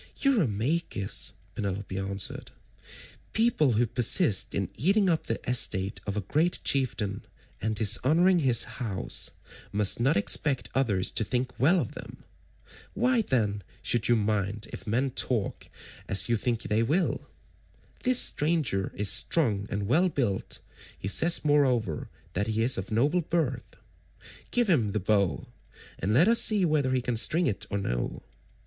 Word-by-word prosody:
"Eurymachus," 150 - 0 0.2
Penelope 100 -1 -5
answered, 95 0 -3 0.8
"people 220 - +2
who 115 +3 +2
persist 120 - +3
in 100 -1 -3
eating 195 - +2
up 160 - -2
the 115 - -2
estate 100 -6 +2
of 100 +1 -3
a - - -1
great 155 - 0
chieftain 110 -7 -1 0.4
and 110 +1 -2
dishonouring 150 - +3
his 125 -6 +3
house 110 -7 -1 0.4
must 105 +1 +1
not 130 +1 +2
expect 130 +6 0
others 105 -9 0
to - - -2
think 125 +4 -2
well 165 +8 +3
of 125 - -4
them. - - -10 0.8
Why 240 +3 +2
then 105 - -1 0.2
should 120 -2 +1
you 120 - +4
mind 105 -1 -2
if - - -9
men 125 +5 -1
talk 120 -4 -2 0.4
as 95 0 +3
you 120 - +1
think 115 +1 -2
they 110 +2 0
will? 155 +11 -1 0.7
This 255 -1 +2
stranger 150 - +2
is 105 - -1
strong 105 -11 +2
and 100 0 -3
well 170 - +2
built, 120 - -3 0.4
he - - -6
says 165 +9 +3
moreover 130 - +1 0.2
that 100 +4 -2
he 110 0 -1
is 125 +2 +3
of 95 0 -4
noble 145 +11 +1
birth. 150 -7 -3 0.7
Give 240 -2 0
him 120 - +1
the 105 - -1
bow, 100 -1 0 0.5
and 95 - -2
let 145 - +4
us 230 0 +6
see 205 -4 +3
whether 150 -5 0
he 130 -1 -1
can 120 -2 -2
string 165 +9 +4
it 100 - -3
or 100 - -2
no. - - -4
120 Hz, 150 wpm, -27 LUFS, 100-155 Hz, 0.8 s, us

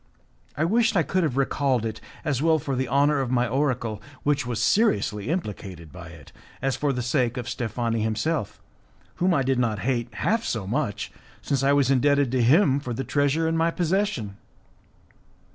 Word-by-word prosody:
I 155 - +1
wished 225 +3 +2
I 170 - +4
could 185 +3 0
have 150 -6 -1
recalled 135 -3 +1
it, 110 -1 -5 0.2
as 140 -4 0
well 160 0 +4
for 140 -2 -3
the 130 0 -1
honour 140 +3 +3
of 130 - -2
my 125 -1 +1
oracle, 120 -4 -1 0.2
which 145 -2 +1
was 120 -4 -2
seriously 110 - +1
implicated 100 - -5
by 90 -1 -10
it, 80 -3 -13 0.3
as 135 0 0
for 145 -1 0
the 125 -2 -2
sake 125 -1 0
of 120 -1 -4
Steffani 115 -2 -2
himself, 110 +4 -1 0.6
whom 185 +2 +2
I 140 -6 +2
did 130 0 +1
not 115 -4 +1
hate 120 -2 -1
half 220 - 0
so 110 - -2
much 105 -2 -2 0.3
since 140 -2 0
I 140 +1 +3
was 140 -2 +3
indebted 140 0 +3
to 130 -1 +1
him 140 - +4
for 125 -4 -5
the 135 - -3
treasure 145 +5 +1
in 165 - 0
my 165 +1 +2
possession. 170 - -1
130 Hz, 185 wpm, -25 LUFS, 115-150 Hz, 0.6 s, I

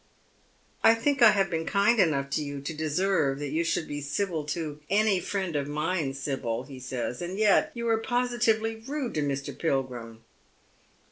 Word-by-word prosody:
" - - -36 0.3
I 225 - +7
think 275 +4 0
I 230 - +10
have 195 -3 +2
been 165 -1 -2
kind 210 +3 +3
enough 140 -7 +2
to 150 - 0
you 145 -1 -5
to 140 +4 -5
deserve 155 -2 +1
that 145 -1 -4
you 160 +3 +1
should 165 -1 -1
be 145 0 -4
civil 160 +3 -2
to 150 -1 -4
any 205 -1 +3
friend 190 -2 -3
of 140 -1 -1
mine, 150 -1 -1
Sibyl," 130 -4 -3
he 130 0 -10
says; 125 0 -4
"and 180 +2 -4
yet 210 -2 +4
you 235 0 -3
are 225 -1 +3
positively 235 -2 +1
rude 270 +2 -4
to 155 - 0
Mr. 140 -1 -3
Pilgrim." 125 -7 -3
165 Hz, 185 wpm, -27 LUFS, 140-215 Hz, 0.3 s, I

